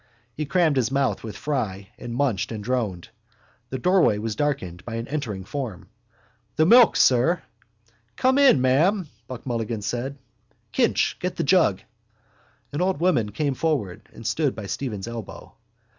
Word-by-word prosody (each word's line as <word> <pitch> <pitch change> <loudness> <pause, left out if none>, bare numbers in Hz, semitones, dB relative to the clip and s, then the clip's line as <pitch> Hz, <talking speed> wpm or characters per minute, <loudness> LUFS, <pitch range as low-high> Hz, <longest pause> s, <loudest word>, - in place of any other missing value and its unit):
_ - - -36 0.3
He 150 +4 -4
crammed 165 -4 +2
his 125 -2 +2
mouth 135 0 0
with 110 -2 -7
fry 105 -10 -3
and 120 -1 -7
munched 115 -6 0
and 110 -2 -5
droned. 110 -7 -2 0.6
The 130 - -3
doorway 180 - +3
was 110 0 -3
darkened 95 -11 -2
by 115 - -6
an 115 +1 -4
entering 125 -10 -4
form. 100 -7 -5 0.7
—The 155 - +4
milk, 235 +5 +7
sir! 130 +8 +3 0.7
—Come 260 +2 +3
in, 270 - +6
ma'am, 165 +9 +2 0.4
Mulligan 115 -3 -3
said. 125 +6 -3 0.5
Kinch, - - +1
get - - -3
the - - -1
jug. - - +3 0.9
An 145 - -1
old 185 -4 +1
woman 160 -12 +2
came 140 +6 -1
forward 130 - -2
and 115 - -12
stood 145 0 0
by 110 - -6
Stephen's 105 -2 -4
elbow. 115 -3 -8
125 Hz, 155 wpm, -24 LUFS, 110-150 Hz, 0.9 s, milk